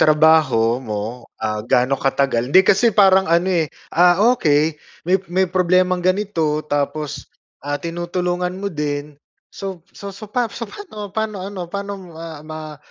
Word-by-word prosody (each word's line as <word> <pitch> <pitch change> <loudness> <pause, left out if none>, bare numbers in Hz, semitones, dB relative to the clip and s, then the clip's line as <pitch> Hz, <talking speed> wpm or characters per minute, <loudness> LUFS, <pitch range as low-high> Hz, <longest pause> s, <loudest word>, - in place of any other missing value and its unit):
trabaho 150 -7 +4
mo, 115 +1 -5 0.2
ah, 110 -1 -2
gaano 125 +3 +2
katagal 135 -1 0
Hindi 190 - +9
kasi 200 +4 +3
parang 190 -2 +5
ano, 170 +2 +2 0.2
eh, - - -7 0.3
ah, 175 +2 +5 0.2
okey 150 -3 +2 0.3
may 185 - +5 0.2
may 190 0 +2
problemang 185 0 +2
ganito 185 -6 +1
tapos, 145 0 -3 0.3
ah, 145 0 -2
tinutulungan 175 +2 -2
mo 200 - -2
din 150 -3 -4 0.3
so 190 -3 -7 0.2
so 200 0 -7
so 205 +2 -10
pa 245 +2 0
so 230 -2 -6
paano 215 - -8
paano 215 -1 -3
ano 185 -2 -6
paano 200 0 -4 0.2
ma 160 -2 -9
ma 155 -1 -8
170 Hz, 150 wpm, -20 LUFS, 145-190 Hz, 0.3 s, Hindi